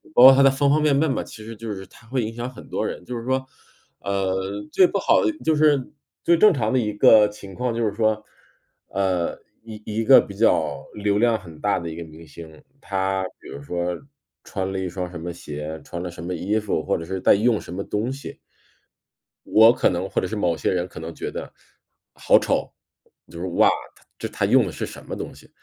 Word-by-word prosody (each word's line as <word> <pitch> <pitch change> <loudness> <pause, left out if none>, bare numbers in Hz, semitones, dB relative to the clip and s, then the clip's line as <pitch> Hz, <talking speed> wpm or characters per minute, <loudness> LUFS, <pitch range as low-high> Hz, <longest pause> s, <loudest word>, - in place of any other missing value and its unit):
包 120 - +7
括 135 +1 +11
他 135 - +4
的 135 - +7
方 135 +1 +1
方 155 +1 +3
面 150 -2 +3
面 150 +2 +2
嘛， - - -1
其 110 - -11
实 115 +1 -8
就 110 0 -6
是 95 -1 -6
他 105 +4 -19
会 125 +1 -1
影 110 +1 -4
响 120 +2 -5
很 130 - -13
多 - - -2
人。 90 - -5
就 125 - -5
是 115 - -5
说， 130 +1 -1 0.5
呃， 95 -1 -1 0.4
最 185 -2 +5
不 - - -2
好 - - +3
的 325 - +2
就 160 - +3
是 150 -3 +2 0.3
最 170 - +4
正 210 +5 +6
常 115 - -1
的 130 - +3
一 105 -3 -1
个 105 0 +6
情 100 -2 -11
况 125 +1 -2
就 115 0 0
是 100 - -2
说， 110 0 0 0.6
呃， 95 -3 -1 0.2
一 110 -1 -10
一 110 +1 -2
个 130 +3 +8
比 100 - -5
较 80 -9 +1
流 105 0 0
量 115 -1 +3
很 80 -4 -13
大 105 -1 +1
的 85 -2 -5
一 - - -7
个 85 - -6
明 80 0 -13
星， 80 -2 -12 0.2
他 95 -1 -1 0.2
比 - - -14
如 70 - -8
说 85 +3 -2 0.5
穿 95 -1 -3
了 95 - -3
一 95 - -2
双 90 0 -4
什 85 - -7
么 85 +2 -5
鞋， 75 -1 -7
穿 85 - -6
了 90 - -4
什 85 - -10
么 90 +2 -3
衣 95 +5 -1
服， 100 -7 -2
或 - - 0
者 80 - -6
是 95 +2 -4
在 - - +6
用 110 +2 +2
什 - - -11
么 100 +2 -4
东 105 +6 -2
西 140 +1 -8 1.1
我 110 +2 +6
可 - - +2
能 90 +2 -2
或 - - 0
者 - - -2
是 110 - -4
某 90 -5 +1
些 75 - 0
人 90 0 -1
可 85 - -10
能 80 +1 -7
觉 - - -5
得， - - -7 0.6
好 - - +4
丑， - - -1 0.6
就 85 - -10
是： 90 - -3
“哇， - - +6 0.3
他 - - -23
这 - - -4
他 - - -2
用 - - +4
的 - - -4
是 - - -4
什 - - -11
么 - - -5
东 - - -6
西。” - - -17
105 Hz, 260 characters per minute, -23 LUFS, 90-120 Hz, 1.1 s, 括